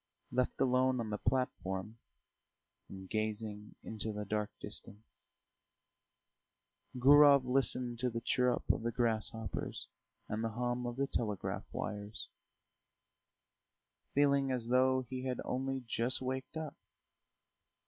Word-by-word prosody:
Left 125 0 0
alone 130 0 +3
on 110 -2 -3
the 105 - -2
platform, 110 -5 -1 0.9
and 95 -1 -9
gazing 110 0 -3
into 110 0 +1
the 105 0 -4
dark 105 +1 -1
distance, 105 +2 -9 1.7
Gurov 140 +1 +8
listened 125 -2 0
to 125 0 +1
the 115 -1 -3
chirrup 125 +1 +1
of - - -1
the 115 +1 -1
grasshoppers 115 -1 -2 0.4
and 110 +2 -2
the 115 - 0
hum 120 +2 -2
of 120 - -4
the 140 +2 +1
telegraph 105 -7 -2
wires, 105 +1 -5 1.9
feeling 140 -1 +4
as 120 -2 -2
though 130 +1 +4
he 130 +1 -5
had 130 -1 -2
only 135 0 -2
just 120 +3 +1
waked 130 +3 -4
up. 155 -3 -4
120 Hz, 120 wpm, -34 LUFS, 110-130 Hz, 1.9 s, Gurov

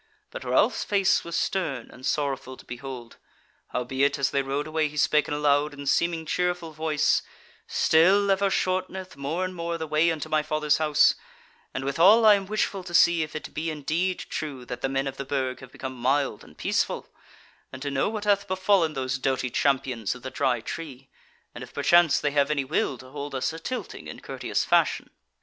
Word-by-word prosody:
But - - -7
Ralph's - - +2
face 195 -2 +2
was 170 0 -5
stern 155 - -2
and 125 - -15
sorrowful 135 -3 -2
to - - -15
behold; 125 -1 -8 0.5
howbeit, 130 +3 0
as 135 -1 +1
they 140 - +1
rode 135 +2 -2
away 155 0 0
he 150 +1 -10
spake 150 0 +3
in 145 - -3
a - - -2
loud 145 0 +2
and 140 0 -8
seeming 170 +2 +1
cheerful 175 0 -1
voice: 155 -1 +1 0.5
"Still 195 +5 +4
ever 195 +1 +2
shorteneth 185 0 -2
more 155 +7 -2
and 185 - -5
more 170 -1 -3
the 160 - -4
way 155 +2 +2
unto 160 -2 -3
my 155 0 +2
Fathers' 150 0 +1
House: 150 -2 +4 0.6
and 135 - -4
withal 185 +11 +5
I 215 - +9
am 195 -1 0
wishful 205 -2 -1
to 175 -2 -4
see 170 -1 +5
if 155 0 -4
it 155 - -6
be 160 +1 -2
indeed 160 +5 -1
true 140 -5 -5
that 125 - -6
the 135 - 0
men 135 0 0
of 135 -1 -5
the - - -3
Burg 130 -2 -2
have 130 -1 -12
become 130 -1 -6
mild 135 -3 +1
and - - -17
peaceful; - - -1 0.6
and 130 - -8
to 145 - -2
know 135 +7 +1
what 215 -1 -4
hath 200 -1 +2
befallen 185 -3 +2
those 130 -1 -2
doughty 130 -1 -1
champions 130 -6 0
of 125 - -13
the 130 - -5
Dry 130 -4 0
Tree; 135 -2 -7 0.4
and - - -8
if - - -13
perchance 175 -2 +4
they 145 - 0
have 140 0 +2
any 145 -2 0
will 135 -2 0
to 130 +1 -13
hold 145 0 -6
us 130 +4 -1
a 160 - -7
tilting 255 +9 -6
in - - -8
courteous - - -2
fashion." - - +2
150 Hz, 205 wpm, -26 LUFS, 135-175 Hz, 0.6 s, I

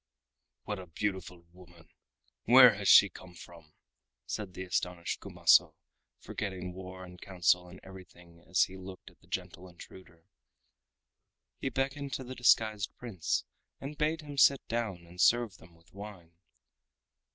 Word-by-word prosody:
"What 105 -2 -5
a 90 - -10
beautiful 90 -1 -4
woman! 85 -2 -17 0.6
Where 125 0 +8
has 100 -1 -4
she 100 - +8
come 90 0 -14
from?" 85 -3 -15 0.5
said 100 -4 -6
the 95 - -5
astonished 90 -1 -3
Kumaso, - - +3 0.4
forgetting 95 -3 -6
war 95 0 -9
and 90 -1 -14
council 90 -1 +1
and 90 +1 -13
everything 90 -3 -15
as 90 +2 +4
he 95 - -5
looked 95 0 -11
at - - -28
the - - -25
gentle 90 +1 -6
intruder. 85 -1 -15 1.3
He 135 - -2
beckoned 135 +1 -3
to 130 - -3
the 130 +1 -8
disguised 110 -4 +2
Prince 100 -10 -3 0.3
and 140 +2 -7
bade 155 +1 -1
him 145 -2 -6
sit 140 +1 +4
down 110 -7 -3
and 90 +1 -7
serve 120 -4 +3
them 85 +1 -18
with 85 +1 -26
wine. 100 -4 -11
95 Hz, 145 wpm, -30 LUFS, 90-115 Hz, 1.3 s, Where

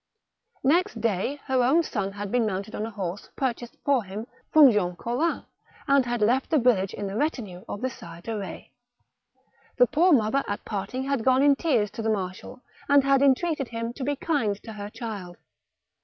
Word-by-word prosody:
Next 350 +9 +2
day 230 +6 -1
her 265 +5 +3
son 200 -9 -3
had 205 -1 -5
been 245 -3 +2
mounted 200 +2 -4
on 215 - -3
a - - -6
horse 200 -3 -5
pur 260 -3 0
chased 240 0 -11
for 275 -5 +3
him 200 +3 -6 0.3
from 295 -4 +8
Jean 180 -5 0
Collin, 245 - -1 0.4
and 275 -3 +4
had 240 -2 0
left 250 +5 +2
the 315 - +3
village 230 -7 +2
in 205 - -4
the 195 0 -4
retinue 220 - -2
of 205 - -5
the 260 - 0
Sire 170 - -11
de 225 +4 -4
Betz. 200 -2 -6 1.1
The 250 - +7
poor 325 +8 +3
mother 265 0 +3
at 205 +1 -4
parting* 210 +5 -3
had 275 -3 -1
gone 260 +2 +4
in 285 -1 +6
tears 245 - +1
to - - -6
the 220 - -1
marshal, 195 +4 -4 0.3
and 285 -1 +6
had 275 0 +3
entreated 280 +1 +2
him 230 0 -4
to 260 - -6
be 285 +2 0
kind 270 -9 0
to 225 - -8
her 205 -1 -7
child. 205 -6 -7
235 Hz, 195 wpm, -26 LUFS, 205-275 Hz, 1.1 s, from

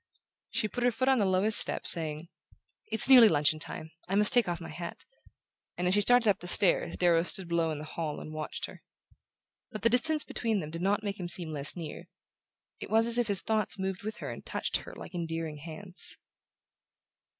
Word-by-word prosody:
She 215 - -1
put 240 +4 -5
her 245 - +4
foot 245 +3 -1
on 265 -2 +3
the 200 - +1
lowest 190 +3 +5
step, - - +1
saying: 160 -1 +2 0.6
"It's 220 +2 +4
nearly 250 -4 +8
luncheon 150 0 +1
time 155 +1 -5 0.2
I 195 - -1
must 210 +3 +5
take 240 -7 +3
off 170 -1 -4
my 165 - -9
hat..." 170 -1 -9 0.7
and 180 - -2
as 180 - +1
she 205 - +2
started 245 +1 +3
up 205 - +2
the 175 - -8
stairs 180 +1 +3
Darrow 170 -2 +2
stood 180 +1 -1
below 170 -1 -1
in 155 - -4
the 150 - -8
hall 155 -1 -5
and 155 - -10
watched 155 0 -3
her. - - -13 0.9
But 215 -4 -9
the 230 - +4
distance 305 +5 +2
between 225 -3 -3
them 155 -3 -7
did 165 +1 -7
not 200 +3 0
make 200 -1 -5
him 175 -1 -5
seem 170 -2 +2
less 145 -1 0
near: 165 -3 -9 0.7
it - - -8
was 225 +1 +2
as 235 +1 +5
if 240 - 0
his 200 -3 +2
thoughts 215 -3 -1
moved 190 -1 -4
with 215 +1 -7
her - - -7
and - - -10
touched - - -2
her - - -12
like - - -11
endearing 165 -3 -5
hands. 170 +5 -4
185 Hz, 215 wpm, -28 LUFS, 165-220 Hz, 0.9 s, nearly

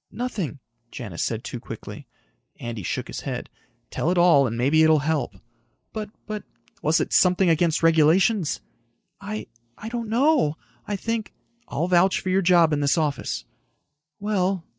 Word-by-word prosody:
"Nothing," 215 - -3 0.3
Janis 105 -10 -6
said 115 +1 -2
too 120 - -6
quickly. - - -9 0.5
Andy 120 -3 -5
shook 85 - -3
his - - -6
head. - - -5 0.4
"Tell 160 - -1
it 180 - +1
all 170 -6 +5
and 115 0 -4
maybe 140 +6 +3
it'll 160 0 +6
help." 155 -3 -1 0.6
"But... 215 -2 -4 0.2
but...." 215 -1 -5 0.4
"Was 155 +2 +2
it - - -2
something 180 -1 +4
against 165 0 +1
regulations?" 165 +4 +3 0.6
"I... 210 +2 -5 0.3
I 220 - -7
don't 235 -2 -4
know. 245 - +3 0.3
I 205 - -1
think...." 225 +2 -3 0.3
"I'll 165 +4 -1
vouch 185 +1 +3
for 185 - -4
your 190 +1 +3
job 170 -3 +4
in 145 - +1
this 145 +3 +2
office." 150 -3 -2 0.7
"Well...." 195 -3 0
175 Hz, 155 wpm, -24 LUFS, 150-205 Hz, 0.7 s, it'll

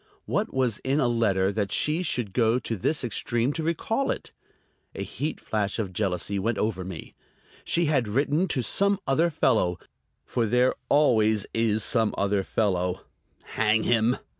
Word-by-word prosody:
What - - -1
was 125 -5 0
in 135 +3 0
a 130 - +2
letter 100 -5 +1
that 100 -1 -2
she 155 +3 0
should 120 - -2
go 115 +1 +3
to 115 -2 -3
this 145 - 0
extreme 120 +2 -1
to 165 - -3
recall 170 - -1
it? - - -4 0.6
A - - -3
heat 155 +2 -4
flash 105 -2 -2
of 100 -5 -3
jealousy 100 0 -1
went 110 +2 -1
over 105 -4 -1
me. 90 -3 -8 0.5
She 170 0 +1
had 140 -7 +1
written 145 - +1
to 130 -6 0
some 200 - +2
other 160 +6 +2
fellow; 110 - +1 0.5
for 115 -2 -1
there 125 +3 +3 0.2
always 110 -8 +3
is 110 -1 +1
some 110 -3 +3
other 100 0 +1
fellow, 90 -3 -1 0.4
hang 110 0 +1
him!... 120 +1 +2
115 Hz, 165 wpm, -26 LUFS, 105-135 Hz, 0.6 s, go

